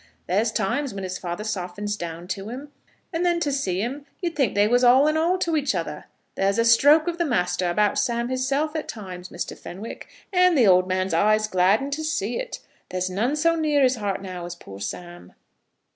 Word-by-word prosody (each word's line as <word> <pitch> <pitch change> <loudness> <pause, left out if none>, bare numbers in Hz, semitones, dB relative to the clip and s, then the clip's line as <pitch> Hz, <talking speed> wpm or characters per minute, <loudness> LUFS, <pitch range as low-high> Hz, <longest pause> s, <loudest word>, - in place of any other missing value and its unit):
There's 215 +5 +1
times 250 +4 -1
when 195 - -5
his 185 0 -4
father 175 +3 -4
softens 205 0 -3
down 170 -2 -6
to 195 +2 -4
him, 275 +5 -8 0.4
and 330 +2 0
then 345 -1 +2
to 290 - 0
see 195 -9 -1
'em, 275 +5 -5
you'd 345 -3 -3
think 265 -9 +1
they 205 +1 +4
was 245 +2 +3
all 255 +3 +6
in 305 - +2
all 335 +4 +2
to 335 -3 0
each 285 -8 0
other. 150 -4 -4 0.3
There's 195 +2 +1
a 230 - +3
stroke 290 +7 +6
of 345 0 -2
the - - +3
master 180 - 0
about 205 +4 +2
Sam 235 -1 0
hisself, 275 +4 -1
at 310 - -3
times, 185 -4 -8
Mr. 175 - -5
Fenwick, 200 +6 -9 0.3
and 360 -2 +4
the 245 - +5
old 185 -1 +5
man's 185 0 -1
eyes 215 +5 +3
gladden 200 +8 +2
to 310 +2 -2
see 245 -8 -1
it. - - -5 0.3
There's 185 0 -2
none 230 +10 0
so 330 +2 +2
near 300 -3 +2
his 255 -1 +3
heart 200 -2 -3
now 180 -2 -6
as 175 0 -6
poor 100 - -11
Sam." 135 - -7
220 Hz, 210 wpm, -24 LUFS, 185-285 Hz, 0.4 s, all